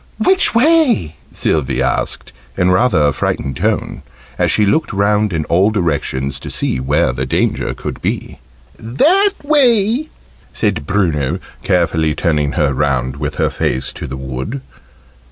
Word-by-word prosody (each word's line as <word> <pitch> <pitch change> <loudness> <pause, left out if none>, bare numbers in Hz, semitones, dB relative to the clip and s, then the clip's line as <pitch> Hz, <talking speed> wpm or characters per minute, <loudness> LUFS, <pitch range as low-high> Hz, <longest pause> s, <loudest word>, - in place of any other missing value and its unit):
"Which 375 - +2
way?" 250 - +3 0.2
Sylvie 65 -4 0
asked, 65 - -2 0.2
in 90 -1 +3
rather 95 -5 +3
a 70 - +3
frightened 65 -1 -2
tone, - - -1 0.4
as - - +2
she 105 - +3
looked 155 +11 +1
round 105 +1 +1
in 80 -3 -2
all 95 +5 +3
directions 75 -8 -2
to - - -8
see - - -1
where 70 +1 +1
the 65 +1 -3
danger - - -1
could - - -6
be. - - -3 0.4
"That 355 - +2
way!" 260 -2 +2 0.4
said 95 -10 -1
Bruno, 85 -6 0 0.2
carefully 80 -3 +1
turning 75 -4 0
her 70 -2 +1
round 65 -2 -1
with 75 +1 -4
her - - 0
face 65 +1 -1
to - - -7
the 65 0 -6
wood. 65 - -5
85 Hz, 145 wpm, -16 LUFS, 70-115 Hz, 0.4 s, way